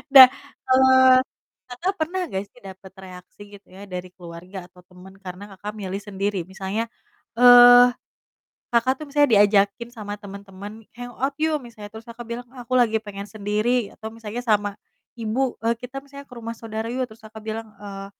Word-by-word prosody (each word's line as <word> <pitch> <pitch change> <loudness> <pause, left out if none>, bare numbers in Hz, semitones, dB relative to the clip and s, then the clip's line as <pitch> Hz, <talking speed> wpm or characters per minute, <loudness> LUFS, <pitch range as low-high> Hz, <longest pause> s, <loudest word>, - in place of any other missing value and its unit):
Dah, 260 -1 +13 0.4
kalau, 260 0 +5 0.7
Kakak, 295 +11 -3
pernah 345 +4 -1
nggak 195 -7 -3
sih - - -20
dapet 190 0 -11
reaksi 185 0 -13 0.2
gitu 205 - -42
ya 195 - -10
dari 180 -1 -6
keluarga 180 +1 -10
atau 180 0 -20
teman 180 +2 -16
karena 195 +2 -9
Kakak, 205 +2 -6
milih 195 0 -4
sendiri? 200 -1 -2
Misalnya, 195 +4 -4 0.5
eee, 245 0 +9 0.8
Kakak, 255 +5 +1
tuh - - -7
misalnya 290 -1 +3
diajakin 205 +3 +2
sama 205 -3 -6
temen-temen, 200 +1 -10
"Hang 245 0 -7
out. 270 +2 -1
yuk!" 315 -1 +2
misalnya, 220 -4 -11
terus 220 0 -11
Kakak 235 0 -9
bilang, 235 +1 -6
"Ah, 250 - -9
aku 255 - -2
lagi 225 -2 +3
pengen 200 -1 -8
sendiri," 215 +3 -1
atau 220 - -8
misalnya, 225 +1 -6
sama 205 -2 +1 0.4
ibu, 235 +3 -1
eee, 230 +1 +2
"Kita," 250 +3 -7
misalnya, 280 0 -12
"ke 250 - -13
rumah 230 0 -6
saudara 220 -1 -6
yuk!" 255 +1 -2
Terus, 220 - -15
Kakak, 220 0 -12
bilang, 220 +1 -5
eee, 195 -1 -8
220 Hz, 175 wpm, -23 LUFS, 200-245 Hz, 0.8 s, Dah